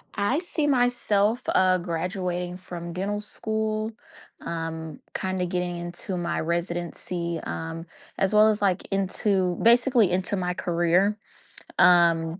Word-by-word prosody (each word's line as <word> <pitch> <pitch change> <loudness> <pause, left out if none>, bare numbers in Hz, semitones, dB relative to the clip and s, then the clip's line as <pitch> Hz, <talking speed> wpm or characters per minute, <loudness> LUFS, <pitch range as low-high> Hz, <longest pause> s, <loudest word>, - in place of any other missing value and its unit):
I 205 +9 +1
see 320 -4 -1
myself, 245 -4 +2
uh, 185 0 +4
graduating 180 +1 -3
from 170 -2 -7
dental 200 +3 -2
school. 220 0 -2 0.5
Um, 160 -2 -5
kinda 185 -1 -2
getting 180 -1 -2
into 175 +2 -5
my 170 -1 -2
residency, 170 0 -3
um, 165 0 -5 0.3
as 195 +1 +1
well 215 +1 +7
as, 210 -1 0
like, 195 -2 +1
into 190 -1 +1
basically 235 -4 +4
into 185 +2 0
my 180 -2 -1
career. 175 +4 +1 0.6
Um, 170 -1 +5
180 Hz, 120 wpm, -25 LUFS, 170-205 Hz, 0.6 s, well